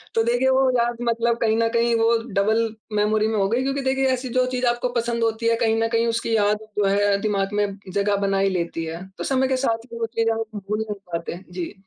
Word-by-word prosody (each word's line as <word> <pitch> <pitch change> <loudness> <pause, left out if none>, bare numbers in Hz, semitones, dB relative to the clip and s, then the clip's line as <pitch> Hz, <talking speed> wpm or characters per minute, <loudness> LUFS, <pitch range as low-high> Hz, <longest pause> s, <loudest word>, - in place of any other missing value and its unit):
तो 225 - +3
देखिए 245 +3 +2
वो 265 0 +3
याद 240 0 +1
मतलब 235 0 +1
कहीं 220 -1 +2
न 230 0 +2
कहीं 235 0 +2
वो 230 +1 +4 0.2
डबल 220 +3 +1 0.2
मेमोरी 215 +1 +2
में 220 -1 -1
हो 195 - +2
गयी 240 +4 +1
क्योंकि 275 +1 -1
देखिए 265 0 +1
ऐसी 255 0 -3
जो 255 - +4
चीज़ 250 0 -1
आपको 240 +1 0
पसंद 235 -1 -1
होती 225 0 0
है, 230 - +3
कहीं 225 -2 +2
न 225 - +2
कहीं 230 0 +1
उसकी 230 0 0
याद 210 0 +2 0.2
जो 205 - +2
है 200 0 +3
दिमाग़ 205 -1 -1
में 205 0 +2 0.3
जगह 200 0 +1
बना 195 0 +1
ही 195 0 +3
लेती 170 -3 -2
है। 165 +3 -6
तो - - -2
समय 265 -1 +2
के 260 0 +1
साथ 230 -3 -1
ही 230 - -6
वो 230 - 0
चीज़ 225 0 +2
हम 225 0 -1 0.2
भूल 210 +2 -3
नहीं 210 - -2 0.2
पाते 170 0 -3
हैं। 180 +3 -11
जी। 180 +1 -5
225 Hz, 255 wpm, -23 LUFS, 205-235 Hz, 0.3 s, वो